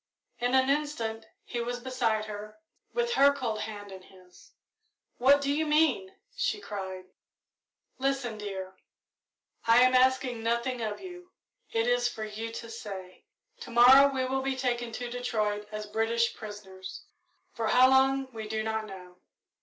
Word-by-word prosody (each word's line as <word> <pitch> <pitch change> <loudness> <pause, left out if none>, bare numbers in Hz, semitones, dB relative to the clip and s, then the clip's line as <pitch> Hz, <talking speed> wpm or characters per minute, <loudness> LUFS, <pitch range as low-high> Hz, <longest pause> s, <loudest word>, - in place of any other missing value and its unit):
In 245 +2 +1
an 260 0 +4
instant 235 -7 -1 0.2
he 240 - -5
was 245 +1 -3
beside 235 -4 -1
her, 215 0 -8 0.3
with 475 0 0
her 280 -6 +6
cold 235 -6 -3
hand 205 -2 -6
in 190 -1 -9
his. 185 -1 -19 0.7
"What 275 +3 +5
do 280 0 0
you 310 +2 +1
mean!" 300 -11 +2 0.2
she - - -1
cried. 190 - -6 0.9
"Listen, 265 -5 -1
dear; 190 -2 -6 0.9
I 230 +1 +7
am 255 0 +4
asking 255 -2 +3
nothing 235 +2 -1
of 215 -2 -3
you 360 -1 -10 0.4
it 225 0 +1
is 245 0 +2
for 220 -2 -6
you 215 +2 -5
to 230 - -7
say. 195 -5 -8 0.3
To - - -9
morrow 260 +4 +7
we 260 -1 -1
will 265 +1 -1
be 270 0 -1
taken 240 -2 -1
to 245 +2 -4
Detroit 215 -4 -2
as 215 0 -5
British 225 +2 0
prisoners 195 -3 -9 0.5
for 225 -1 -2
how 250 +3 +6
long 265 0 +3
we 220 -1 -6
do 220 0 -2
not 220 0 -2
know. 180 -2 -11
235 Hz, 155 wpm, -29 LUFS, 215-260 Hz, 0.9 s, I